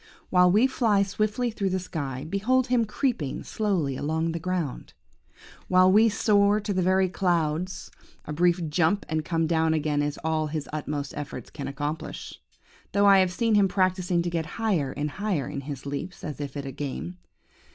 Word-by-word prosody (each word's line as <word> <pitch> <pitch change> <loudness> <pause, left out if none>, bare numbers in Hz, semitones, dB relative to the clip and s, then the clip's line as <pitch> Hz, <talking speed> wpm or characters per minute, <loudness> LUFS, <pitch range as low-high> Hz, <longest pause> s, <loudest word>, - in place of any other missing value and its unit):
While 180 -1 +5
we 215 +6 +5
fly 225 -6 +2
swiftly 215 +5 -1
through 200 -3 -1
the 190 - 0
sky, 145 -8 -4
behold 230 +8 +1
him 245 -2 +2
creeping 210 - -2
slowly 185 -11 -1
along 160 +4 -1
the 165 - -3
ground. 170 -5 -3 0.7
While 185 0 +5
we 220 +3 +6
soar 205 0 +3
to 205 -1 -3
the 185 - +1
very 185 +1 +3
clouds, 175 -1 -1 0.3
a 150 - -5
brief 175 +1 +2
jump 175 +6 +1
and 155 0 -1
come 165 0 0
down 160 0 +2
again 150 -1 0
is 145 0 -2
all 160 -1 0
his 150 -1 -4
utmost 145 -2 -3
efforts 140 -5 -7
can 140 - -6
accomplish, 145 +3 -5 0.5
though 200 0 +3
I 200 -1 +7
have 185 -1 +3
seen 230 +4 +1
him 205 -2 +5
practising 185 -2 +1
to 175 - -1
get 165 -2 -2
higher 190 -12 0
and 145 +1 -2
higher, 185 -7 -2
in 140 - -5
his 140 -1 -7
leaps, 145 +6 -5
as 150 -3 -5
if 145 0 -5
at 140 - -5
a 135 - -5
game. 90 - -5
175 Hz, 185 wpm, -26 LUFS, 150-200 Hz, 0.7 s, I